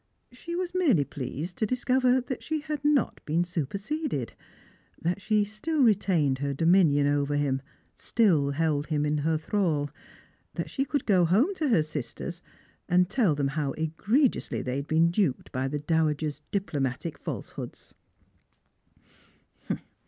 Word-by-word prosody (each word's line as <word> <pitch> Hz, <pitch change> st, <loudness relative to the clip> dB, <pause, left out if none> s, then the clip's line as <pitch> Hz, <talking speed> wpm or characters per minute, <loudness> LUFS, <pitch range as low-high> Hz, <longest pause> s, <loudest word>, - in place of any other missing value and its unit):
She 335 Hz, +8 st, -7 dB
was 360 Hz, 0 st, -2 dB
merely 295 Hz, -, +3 dB
pleased 145 Hz, +6 st, -6 dB
to 220 Hz, -, +1 dB
discover 255 Hz, +1 st, +2 dB
that 255 Hz, +1 st, -5 dB
she 315 Hz, -1 st, -2 dB
had 300 Hz, -2 st, -4 dB
not 290 Hz, -4 st, +1 dB
been 165 Hz, +3 st, +1 dB
Buperseded; 185 Hz, -, -3 dB, 0.7 s
that 175 Hz, +4 st, -1 dB
she 210 Hz, 0 st, +2 dB
still 270 Hz, +9 st, -1 dB
retained 180 Hz, -, +3 dB
her 140 Hz, 0 st, -2 dB
dominion 165 Hz, -3 st, +4 dB
over 145 Hz, 0 st, +1 dB
him, 135 Hz, -2 st, 0 dB, 0.3 s
still 170 Hz, -12 st, +2 dB
held 150 Hz, 0 st, 0 dB
him 150 Hz, -2 st, 0 dB
in 150 Hz, 0 st, +1 dB
her 160 Hz, +2 st, +1 dB
thrall; 155 Hz, -5 st, 0 dB, 0.6 s
that -, -, -4 dB
she 270 Hz, -, 0 dB
could 285 Hz, +1 st, -1 dB
go 190 Hz, -4 st, +4 dB
home 215 Hz, -, +3 dB
to 310 Hz, -6 st, -1 dB
her 170 Hz, -10 st, +4 dB
sisters, 155 Hz, +4 st, -6 dB, 0.5 s
and 180 Hz, +1 st, +3 dB
tell 215 Hz, -, +3 dB
them 140 Hz, -1 st, 0 dB
how 140 Hz, -1 st, -2 dB
egregiously 205 Hz, -, 0 dB
they 125 Hz, +1 st, -2 dB
had 140 Hz, +1 st, -4 dB
been 165 Hz, +1 st, +3 dB
duped 175 Hz, -8 st, 0 dB
by 130 Hz, +1 st, -1 dB
the 150 Hz, +2 st, -2 dB
dowager's 150 Hz, -1 st, 0 dB
diplomatic 150 Hz, -5 st, -2 dB
falsehoods. -, -, -7 dB
170 Hz, 145 wpm, -27 LUFS, 145-230 Hz, 0.7 s, dominion